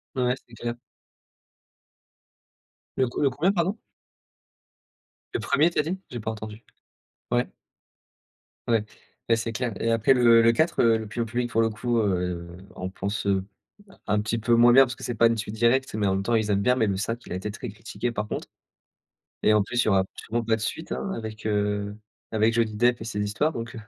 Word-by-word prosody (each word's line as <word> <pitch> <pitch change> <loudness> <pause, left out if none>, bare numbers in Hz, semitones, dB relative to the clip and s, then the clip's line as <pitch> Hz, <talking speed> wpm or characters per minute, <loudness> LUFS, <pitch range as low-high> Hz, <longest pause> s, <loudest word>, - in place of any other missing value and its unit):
Ouais, 125 -1 +2
c'est 120 - -16
clair. 120 +1 -4 2.2
Le 130 - +3
le 140 - +3
combien 160 +9 +1
pardon? 190 +3 -1 1.5
Le - - +1
1er 155 +5 +3
tu - - -4
as - - +5
dit? 180 +5 -3
J'ai 120 - -5
pas 110 - -3
entendu. 110 0 -9 0.7
Ouais. 120 0 +2 1.2
Ouais 115 -2 +2 0.4
et 115 - +4
c'est 115 0 -3
clair. 120 +1 -2
Et 115 - +1
après 115 +4 +4
le 120 -2 +6
le 115 - +5
4, 160 +5 +2
le 115 -1 +4
l'opinion 110 +2 -3
publique 120 +2 -2
pour 115 - +3
le 115 - +2
coup, 120 +2 -1
heu, 90 -4 -1 0.3
on 95 0 -5
pense, 100 +2 -4 0.8
un 105 0 +2
petit 110 +2 -1
peu 115 +2 +2
moins 120 +1 +7
bien 135 +2 +9
parce 130 0 -6
que 135 - -9
c'est 120 - -2
pas 115 +1 +5
une 115 0 -1
suite 105 0 -4
directe, 120 +4 +2
mais 105 -2 0
en 95 - +1
même 95 - -1
temps, 120 - +1
ils 110 -2 +1
aiment 100 0 +2
bien, 125 - +4
mais 115 - +2
le 100 - 0
5, 115 +4 -3
il - - -7
a - - -2
été 95 +3 -4
très 120 +3 -7
critiqué 115 +3 -4
par 105 -1 -3
contre - - -5 1.0
et 110 - +5
en 105 - +4
plus, 120 +3 0
il - - -6
y - - +4
aura 95 -2 +4
surement 115 +1 -3
pas 115 0 +2
de 110 - -7
suite, 160 +9 -4
hein, 195 - -3
avec, 110 - -7
heu, 105 -1 -1 0.4
avec 110 +1 +3
Johnny 115 -2 +1
Depp 120 +2 +3
et - - -3
ses 105 -3 -3
histoires 125 +10 0
donc 115 -2 -6
heu 115 - -6
115 Hz, 210 wpm, -26 LUFS, 105-120 Hz, 2.2 s, bien